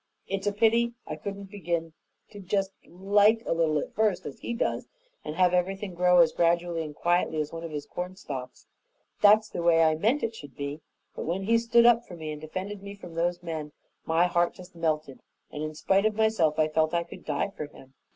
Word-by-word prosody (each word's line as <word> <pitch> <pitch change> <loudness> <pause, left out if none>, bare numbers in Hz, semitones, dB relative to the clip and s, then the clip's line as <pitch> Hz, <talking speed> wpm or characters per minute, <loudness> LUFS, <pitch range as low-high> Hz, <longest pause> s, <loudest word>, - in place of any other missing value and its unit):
It's 195 +1 -3
a - - +3
pity 230 +3 +2
I 155 - -5
couldn't 200 +4 -7
begin 170 -4 -3 0.4
to 205 - -10
just 195 0 -1 0.2
LIKE 205 +5 +3
a - - +1
little 160 -2 +2
at - - -4
first, 215 -4 +1
as 140 - -7
he - - -5
does 235 - -1 0.4
and 150 - -5
have 180 0 +3
everything 190 +2 -1
grow 180 0 +5
as 165 -2 +4
gradually 170 0 +1
and 150 -2 -8
quietly 175 -2 +1
as 150 +1 -3
one 165 0 -6
of 165 - -5
his 150 -2 -5
cornstalks. 175 -8 -7 0.6
That's 210 +1 +6
the 175 - -5
way 165 -1 +5
I 160 -1 +4
meant 225 - +1
it 230 - -1
should 145 - -11
be; 145 +2 -5 0.3
but - - -5
when 180 +4 -2
he 230 +3 +3
stood 235 0 +4
up 235 0 +5
for 175 - -9
me 155 -2 -6
and 150 0 -7
defended 190 +6 -5
me 200 0 -8
from 180 -4 -11
those 175 +1 -1
men, 155 -3 -5 0.3
my 165 +2 +3
heart 175 -1 +1
just 180 -1 -13
melted, 155 -4 -2 0.3
and 150 - -6
in 155 0 -4
spite 195 +6 +2
of 215 - -2
myself, 220 -9 +2
I 155 -1 +3
felt 155 +1 +1
I 170 - +1
could 170 - -12
die - - -1
for 150 - -5
him. 135 -2 -17
175 Hz, 220 wpm, -27 LUFS, 160-200 Hz, 0.6 s, That's